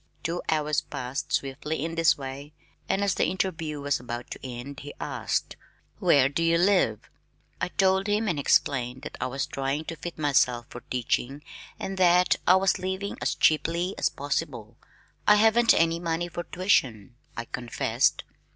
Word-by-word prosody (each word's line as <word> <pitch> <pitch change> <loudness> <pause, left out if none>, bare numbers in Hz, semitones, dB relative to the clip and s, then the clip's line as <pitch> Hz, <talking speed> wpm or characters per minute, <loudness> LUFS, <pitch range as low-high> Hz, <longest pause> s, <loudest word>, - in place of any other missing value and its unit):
Two 170 +2 -2
hours 150 -1 +1
passed 125 +3 -5
swiftly 145 +3 -2
in 165 - -4
this 165 0 +3
way 140 +2 -7 0.4
and 195 - +1
as 200 -2 +2
the - - +1
interview 165 -5 -2
was 145 0 0
about 120 0 -7
to - - -8
end 130 +2 -7
he 145 0 -9
asked, - - -2 0.4
"Where 135 -2 +5
do 140 +4 -2
you 165 0 +3
live?" 175 - +2 0.5
I - - +1
told 190 +2 +2
him 210 +2 +1
and 170 -7 0
explained 130 -2 +1
that - - -7
I - - 0
was 135 +2 -2
trying 135 +3 -3
to 165 - -5
fit 170 +1 -7
myself 130 -5 +2
for 120 - -8
teaching 130 +3 -1 0.4
and 190 0 -5
that 180 0 +4
I 180 - +7
was 190 0 +2
living 190 +2 -3
as - - 0
cheaply 170 +4 +2
as - - +2
possible. 140 -6 -4 0.5
"I 210 - +8
haven't 225 +2 +5
any 165 0 +2
money 170 0 -2
for 175 +1 -5
tuition," 130 - 0 0.2
I 120 - -3
confessed. 120 0 0
155 Hz, 170 wpm, -26 LUFS, 135-180 Hz, 0.5 s, I